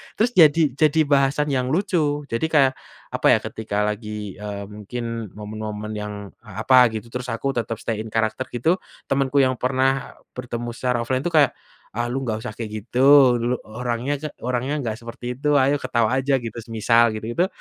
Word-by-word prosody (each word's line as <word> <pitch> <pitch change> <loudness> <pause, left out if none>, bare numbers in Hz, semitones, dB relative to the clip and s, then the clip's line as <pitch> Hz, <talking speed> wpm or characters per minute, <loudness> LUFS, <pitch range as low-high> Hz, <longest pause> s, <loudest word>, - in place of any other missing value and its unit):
terus 235 +3 +2
jadi 160 -1 +7 0.2
jadi 155 +1 +3
bahasan 140 +1 +2
yang 130 -2 0
lucu. 160 -6 0
Jadi 115 +6 -1
kayak, 135 -3 +5 0.4
apa - - +1
ya, - - +4
ketika 105 -2 -3
lagi, 105 -2 -5
eee, 105 -1 -5
mungkin 115 +2 -5
momen-momen 105 0 -6
yang 105 0 -5 0.3
a 100 +3 -6
apa 130 0 +7
gitu 110 +1 -6
terus 125 0 -5
aku 135 +4 -1
tetap 115 -1 -1
stay 115 - -2
in 110 - -10
character 110 +3 0
gitu 160 +10 +2 0.3
temanku 135 0 +2
yang 130 -1 +1
pernah 130 +1 0 0.2
bertemu 120 -1 -4
secara 125 -2 0
offline 130 +2 0
itu 175 - -1
kayak, 150 -3 +5 0.4
"Ah, 120 +1 -1
lu 135 +2 -2
enggak 110 -4 -2
usah - - -4
kayak 115 -2 -5
gitu, 130 0 +6
lu 120 +2 0
orangnya 120 +4 -2
ga 155 - -4
orangnya 125 +3 -1
enggak 115 -5 -3
seperti 120 +1 -6
itu, 150 0 +2
ayo 135 +2 +3
ketawa 120 -1 +1
aja," 135 +1 +1
gitu, 115 -3 -7
semisal 115 +1 +3
gitu-gitu, 120 +11 -1
125 Hz, 180 wpm, -22 LUFS, 110-135 Hz, 0.4 s, jadi